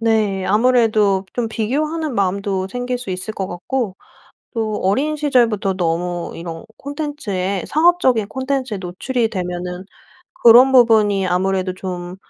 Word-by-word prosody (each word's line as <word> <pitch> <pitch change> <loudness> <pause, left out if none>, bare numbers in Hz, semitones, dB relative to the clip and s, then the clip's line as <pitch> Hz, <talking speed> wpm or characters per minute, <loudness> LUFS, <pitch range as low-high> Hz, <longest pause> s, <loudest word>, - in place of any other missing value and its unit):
네. 215 -4 +1
아무래도 215 -3 +3
좀 235 -2 -1
비교하는 300 +7 -2
마음도 195 -1 -1
생길 245 +2 -3
수 220 -6 -6
있을 185 +4 -4
것 190 - -3
같고 195 +3 -3 0.6
또 215 -2 -1
어린 275 +11 +1
시절부터 230 -9 +1
너무 175 0 -2
이런 165 -1 -7
콘텐츠에 275 - -3
상업적인 300 - +3
콘텐츠에 260 -3 -2
노출이 220 +7 -2
되면은 180 -1 -4 0.6
그런 245 +3 +8
부분이 215 -6 +4
아무래도 185 +1 0
좀 180 -1 -6
210 Hz, 295 characters per minute, -19 LUFS, 185-250 Hz, 0.6 s, 그런